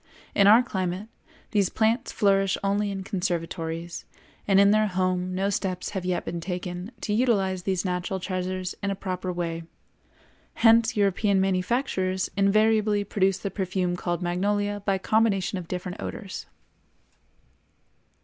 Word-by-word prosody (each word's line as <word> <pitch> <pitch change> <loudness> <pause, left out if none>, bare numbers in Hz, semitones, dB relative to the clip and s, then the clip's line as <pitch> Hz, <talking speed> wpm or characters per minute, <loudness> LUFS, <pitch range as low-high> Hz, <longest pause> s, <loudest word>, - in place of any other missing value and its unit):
In 200 -1 +5
our 225 +4 +8
climate 190 -1 -3 0.4
these 200 -4 +2
plants 225 +2 +1
flourish 195 -2 +2
only 200 +1 +1
in 195 -1 -4
conservatories, 170 -3 -3 0.4
and 195 -1 +5
in 200 0 +6
their 215 0 +3
home 185 -1 -1
no 195 +2 0
steps 185 -2 -2
have 190 -3 -3
yet 180 -1 -1
been 170 -1 -4
taken 180 +2 -5
to 210 - -1
utilize 200 -6 +1
these 190 0 -1
natural 180 +1 -2
treasures 185 0 -3
in 200 - -1
a 195 - -1
proper 185 -1 -4
way; 170 -2 -3 0.9
hence 230 0 +4
European 200 0 +2
manufacturers 190 0 0
invariably 210 +1 +3
produce 195 -2 +1
the 195 0 -4
perfume 185 -2 -1
called 175 -1 -2
magnolia 205 +3 0
by 195 -1 +3
combination 195 -2 +1
of 170 - -9
different 180 0 -5
odors. 195 -4 -6
190 Hz, 140 wpm, -26 LUFS, 180-205 Hz, 0.9 s, our